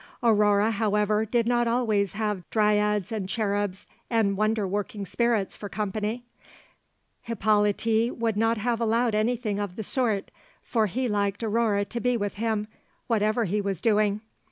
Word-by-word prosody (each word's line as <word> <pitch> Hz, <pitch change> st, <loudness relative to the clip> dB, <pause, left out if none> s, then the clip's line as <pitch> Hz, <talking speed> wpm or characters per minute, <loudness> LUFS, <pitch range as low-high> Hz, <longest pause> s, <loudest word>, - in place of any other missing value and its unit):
Aurore, 210 Hz, -1 st, +4 dB
however, 210 Hz, 0 st, +1 dB
did 235 Hz, +1 st, +1 dB
not 240 Hz, 0 st, +2 dB
always 220 Hz, -5 st, +1 dB
have 210 Hz, -4 st, -3 dB
dryads 210 Hz, -2 st, +2 dB
and 205 Hz, -4 st, -3 dB
cherubs 205 Hz, -2 st, -1 dB, 0.2 s
and 220 Hz, -4 st, +2 dB
wonder 215 Hz, 0 st, +1 dB
working 205 Hz, +1 st, -3 dB
spirits 230 Hz, -1 st, 0 dB
for 205 Hz, -, -7 dB
company; 215 Hz, +3 st, -3 dB, 1.0 s
Hippolyte 220 Hz, +1 st, +1 dB
would 230 Hz, -2 st, 0 dB
not 225 Hz, +2 st, +2 dB
have 235 Hz, +2 st, -1 dB
allowed 230 Hz, +1 st, +2 dB
anything 215 Hz, -1 st, 0 dB
of 200 Hz, -3 st, -4 dB
the 220 Hz, -, -4 dB
sort, 220 Hz, -3 st, -1 dB, 0.3 s
for 220 Hz, -3 st, +1 dB
he 250 Hz, +7 st, -2 dB
liked 205 Hz, 0 st, -1 dB
Aurore 215 Hz, -2 st, +1 dB
to 240 Hz, -, -4 dB
be 250 Hz, 0 st, +1 dB
with 205 Hz, -2 st, -2 dB
him, 215 Hz, -1 st, -1 dB, 0.4 s
whatever 220 Hz, 0 st, +1 dB
he 205 Hz, +3 st, 0 dB
was 195 Hz, -3 st, -2 dB
doing. 210 Hz, -2 st, +2 dB
215 Hz, 150 wpm, -26 LUFS, 205-230 Hz, 1.0 s, Aurore